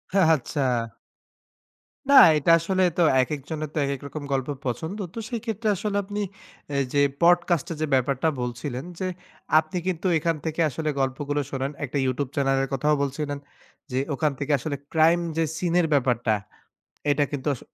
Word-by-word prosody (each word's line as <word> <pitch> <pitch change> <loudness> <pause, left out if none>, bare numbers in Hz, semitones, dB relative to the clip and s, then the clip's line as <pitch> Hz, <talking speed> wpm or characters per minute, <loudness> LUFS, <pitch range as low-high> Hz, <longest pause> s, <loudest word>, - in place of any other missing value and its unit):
আচ্ছা। 160 -5 +2 1.5
না, - - +5 0.2
এটা 160 +3 +3
আসলে 185 +3 0
তো - - +3 0.2
একেকজনের 150 +2 -4
তো - - -6
একেক 140 -1 -3
রকম 150 0 -7
গল্প 135 -1 -1 0.2
পছন্দ। 160 - -3 0.2
তো - - -5
সেই 235 -3 -3
ক্ষেত্রে 220 0 -2
আসলে 205 +2 -2
আপনি 205 +1 -4 0.5
এ - - +1 0.2
যে 140 - +4 0.2
podcast 175 -1 +3
এর - - -3
যে - - +2
ব্যাপারটা 135 +3 +2
বলছিলেন 125 +3 -4
যে 185 - -1 0.5
আপনি 155 +3 -4
কিন্তু 185 0 -1
এখান 165 +1 0
থেকে 160 +1 -1
আসলে 155 +3 -3
গল্পগুলো 145 +2 -1
শোনেন। 135 +1 -2
একটা 135 - -4
YouTube 130 +1 -1
Channel 135 -1 +2
এর 135 - -3
কথাও 150 +3 +2
বলছিলেন 145 +1 -2 0.5
যে 130 - 0 0.2
ওখান 150 +2 +1
থেকে 145 +1 -2
আসলে 145 +2 -3 0.2
crime 165 +2 +4
যে 165 - +3
seen 175 -1 -1
এর 165 - +2
ব্যাপারটা, 125 -4 +2 0.8
এটা 145 0 +3
কিন্তু 145 -1 -5
আস - - -11
150 Hz, 165 wpm, -25 LUFS, 135-170 Hz, 1.5 s, না